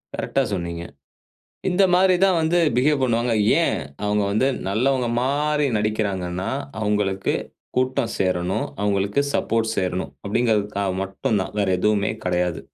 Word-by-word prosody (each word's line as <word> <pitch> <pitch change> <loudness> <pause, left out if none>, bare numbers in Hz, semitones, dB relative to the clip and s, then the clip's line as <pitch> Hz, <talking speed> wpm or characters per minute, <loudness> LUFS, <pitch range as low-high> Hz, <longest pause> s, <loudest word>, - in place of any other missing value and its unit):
கரெக்ட்டா 135 - 0
சொன்னீங்க. 85 -2 -3 0.9
இந்த 185 +2 +2
மாரி 185 +1 +5
தான் 185 -3 +3
வந்து 160 +2 +2 0.2
பிஹேவ் 140 +2 +2
பண்ணுவாங்க. 120 -1 +1 0.3
ஏன் - - 0 0.2
அவங்க 105 0 +1
வந்து 110 +6 +2 0.2
நல்லவங்க 125 +4 +1
மாரி 150 +2 +1
நடிக்கிறாங்கன்னா, 100 -4 -2 0.3
அவங்களுக்கு 105 -2 0 0.4
கூட்டம் 130 -2 0
சேரணும், 90 -1 0 0.2
அவங்களுக்கு 100 +3 +1
சப்போர்ட் 115 0 0
சேரணும் 90 -6 -2
அப்படிங்கிறதுக்காக 105 -3 0
மட்டும்தான். 95 +1 -2
வேற 100 -2 +1
எதுவுமே 105 +1 +1
கெடையாது. 90 -2 0
105 Hz, 120 wpm, -22 LUFS, 95-130 Hz, 0.9 s, மாரி